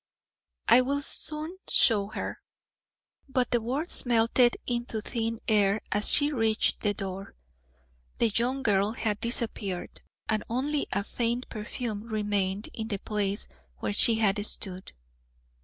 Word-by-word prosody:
"I 250 - +7
will 280 +3 -1
soon 310 +4 -3
show 205 -4 +5
her 215 - -5 0.4
" - - -66
But 255 -2 0
the 240 - +2
words 270 +9 +1
melted 240 0 +3
into 240 -2 -2
thin 225 +1 -3
air 205 -1 +3
as 210 0 +4
he 290 +1 +3
reached 225 -5 +1
the 205 -1 0
door. 195 0 -6 0.8
The 230 - +3
young 250 +5 0
girl 205 -1 +2
had 215 -3 -2
disappeared, 220 -6 -2 0.3
and 215 -1 0
only 280 +5 -1
a 200 - 0
faint 235 +3 -2
perfume 215 0 -5
remained 205 -2 -1
in 220 -1 -4
the 205 -3 -2
place 205 0 -2 0.3
where 105 +10 -2
she 230 - +5
had 210 -2 +1
stood. 190 -3 -4
225 Hz, 140 wpm, -28 LUFS, 205-245 Hz, 0.8 s, I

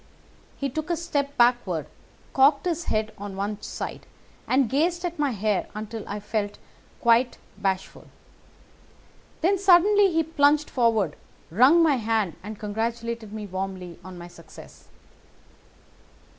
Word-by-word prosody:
He 275 - -1
took 310 +5 -4
a 345 - 0
step 290 -4 -2
backward, 240 -9 +2 0.5
cocked 280 +3 +4
his 340 -1 -1
head 215 0 -1
on 200 -1 -6
one 205 +2 -3
side, - - -6 0.4
and 260 -1 +3
gazed 335 +7 0
at 345 -2 -4
my 290 -1 +2
hair 210 -4 -1
until 215 0 -6
I 205 - -3
felt 205 0 -3 0.4
quite 235 +1 +3 0.2
bashful. 190 -1 -3 1.3
Then 380 +3 +2
suddenly 395 +1 +5
he 325 -1 +2
plunged 300 -1 +2
forward, 220 - +1 0.4
wrung 265 - +6
my 295 -4 +3
hand, 220 -6 0
and 210 +2 -8
congratulated 230 +1 -3
me 215 -1 -6
warmly 185 -2 -5
on 185 0 -10
my 175 0 -9
success. 170 -1 -15
230 Hz, 130 wpm, -25 LUFS, 205-300 Hz, 1.3 s, wrung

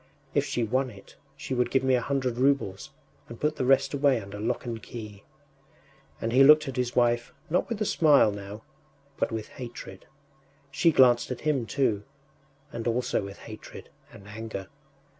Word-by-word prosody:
If - - +2
she 120 - -1
won 130 +4 0
it 100 -4 -15 0.2
she 140 - -5
would 125 -1 +1
give 135 -1 +1
me 130 0 +2
a 125 - +3
hundred 130 -2 -1
roubles, 130 -8 +1 0.4
and 115 - -9
put 150 +1 0
the 130 - -1
rest 135 +1 +3
away 140 -3 +3
under 100 0 -9
lock 120 +4 -2
and 115 -2 -5
key.” 105 -5 -9 1.0
And 115 +1 -2
he 135 +2 +7
looked 150 +2 +7
at 135 - -5
his 125 -1 -2
wife, 120 -1 +2 0.2
not 180 - +1
with 230 -3 -3
a - - +2
smile 145 - +4
now, 100 +1 -8 0.5
but - - 0
with 110 -1 -4
hatred. 120 -6 -9 0.6
She 165 +4 +3
glanced 125 -4 +5
at 125 - -5
him 140 -6 0
too, 115 -8 0 0.7
and 115 0 -5
also 120 0 0
with 100 0 -8
hatred 110 -1 -10 0.2
and 100 - -14
anger. 105 -2 -7
120 Hz, 180 wpm, -27 LUFS, 110-135 Hz, 1.0 s, he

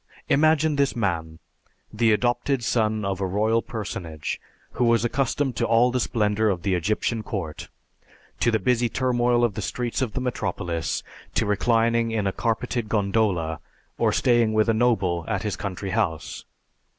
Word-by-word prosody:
Imagine 155 0 +3
this 140 -1 +1
man, 85 -8 -2 0.6
the 110 +1 +3
adopted 120 +4 +1
son 110 -3 0
of 100 0 -2
a 95 - 0
royal 110 +4 +1
personage, 85 -10 -5 0.3
who - - -1
was 115 0 +3
accustomed 130 +1 0
to - - +1
all 120 +2 +4
the 125 - 0
splendor 110 -2 +1
of 90 -4 -2
the 95 - +1
Egyptian 105 +5 0
court, 95 -8 -5 0.7
to - - +3
the 110 - +3
busy 120 +3 +1
turmoil 120 -1 +1
of 120 -4 +2
the 105 - -4
streets 120 +8 -2
of 120 -5 -1
the - - -2
metropolis, 90 -9 -2 0.3
to - - +2
reclining 115 +3 +2
in 110 -3 -1
a 95 - +1
carpeted 120 -1 -2
gondola 100 -7 0 0.4
or - - +3
staying 120 -3 +3
with 110 0 +3
a 115 - +3
noble 100 -8 +1
at 95 - -1
his 105 -2 -2
country 95 -1 -5
house. 80 -4 -2
110 Hz, 165 wpm, -24 LUFS, 100-120 Hz, 0.7 s, all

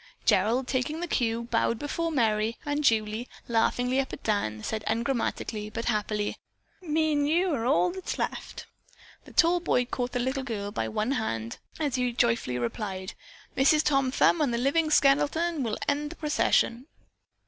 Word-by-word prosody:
Gerald, 230 +7 +3
taking 265 +4 -1
the 350 - -3
cue, 235 -5 0
bowed 230 0 0
before 330 +5 -2
Merry 225 -4 +1
and 290 +1 -1
Julie, 220 -1 +1 0.2
laughing 245 +2 +1
up 270 - -1
at - - -8
Dan, 110 - -1
said 215 -1 -3
ungrammatically 225 -2 -2
but 230 +2 -5
happily: 210 -2 -1 0.4
"Me'n 310 -3 +1
you 345 +3 +2
are 235 -3 -1
all 305 +6 +3
that's 375 0 -5
left." - - -4 0.6
The - - -13
tall 345 +1 +4
boy 250 -7 +1
caught 245 0 -3
the 250 - 0
little 260 +2 -1
girl 210 -6 -4
by 110 - -2
one 215 - -1
hand 115 - -3 0.2
as 290 -4 0
he 250 -1 0
joyfully 230 - +1
replied: 190 - -4 0.4
"Mrs. 300 +3 +4
Tom 275 -3 +2
Thumb 310 +5 +3
and 285 -5 +2
The 235 - 0
Living 285 +6 +2
Skeleton 300 +3 +3
will 225 -4 -1
end 295 +1 0
the 340 - -9
procession." 285 -5 +1
250 Hz, 165 wpm, -27 LUFS, 220-295 Hz, 0.6 s, tall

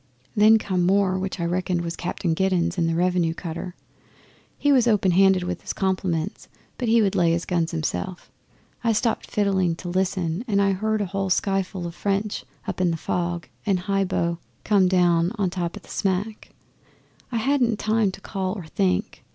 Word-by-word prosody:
Then 215 +1 +7
come 190 -4 -1
more, 190 0 +2
which 190 0 -4
I 170 - -1
reckoned 180 0 0
was 170 0 -4
Captain 175 -1 -2
Giddens 175 -1 +1
in 165 - +2
the 165 - 0
Revenue 175 -1 +1
cutter. 170 +2 -6 0.8
He 290 - +2
was 250 -4 +4
open 200 -5 +3
handed 190 0 +4
with 180 -1 -4
his - - -4
compliments, 185 -4 -2 0.3
but 245 - -1
he 225 0 +5
would 195 -1 +1
lay 175 -4 +3
his 170 0 -1
guns 170 -2 0
himself. 155 - -4 0.5
I 230 -1 +3
stopped 225 +1 0
fiddling 190 -4 +1
to 175 +1 -7
listen, 185 0 -1
and 200 -3 +2
I 200 0 +3
heard 215 +3 0
a - - 0
whole 195 -1 -1
skyful 190 -1 0
o' 170 - -4
French 200 +4 -2 0.2
up - - -3
in 180 - +3
the 165 - -1
fog 175 +1 -2 0.2
and 200 -3 +2
a - - -6
high 195 +1 +1
bow 170 -2 -1 0.2
come 200 -3 +4
down 175 0 +3
on 195 -5 0
top 175 -2 -3
o' - - -6
the - - -21
smack. 200 +3 -2 0.8
I 235 - -1
hadn't 245 -2 +2
time 215 -1 +1
to 195 - -10
call 190 -2 -3
or 180 - -7
think. 95 -11 -1
185 Hz, 190 wpm, -24 LUFS, 175-200 Hz, 0.8 s, Then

